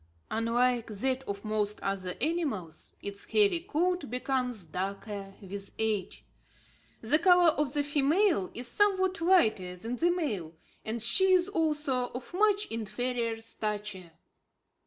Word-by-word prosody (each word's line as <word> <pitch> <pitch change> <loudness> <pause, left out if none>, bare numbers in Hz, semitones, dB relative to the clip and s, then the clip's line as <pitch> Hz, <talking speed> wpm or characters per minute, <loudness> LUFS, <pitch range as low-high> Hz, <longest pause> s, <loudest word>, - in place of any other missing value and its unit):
Unlike 235 +1 +1
that 255 +5 -1
of 200 +1 -5
most 210 -1 -1
other 190 -2 -2
animals, 275 - -2
its 200 0 -6
hairy 400 -5 +3
coat 355 - -1
becomes 250 -4 -2
darker 195 +3 -5
with 200 0 -7
age. 215 -4 -2 0.8
The 265 +8 +2
colour 355 0 +6
of 295 -3 -1
the 290 - +2
female 290 - +2
is 245 +1 -4
somewhat 380 0 +2
lighter 220 - +3
than 230 +7 -5
the 340 +5 +3
male, 215 - -2 0.3
and 220 0 -3
she 375 +11 +4
is 365 +1 +3
also 300 -8 0
of 250 +6 -7
much 415 +2 +3
inferior 230 +1 -2
stature. 210 -5 -4
245 Hz, 130 wpm, -30 LUFS, 205-330 Hz, 0.8 s, colour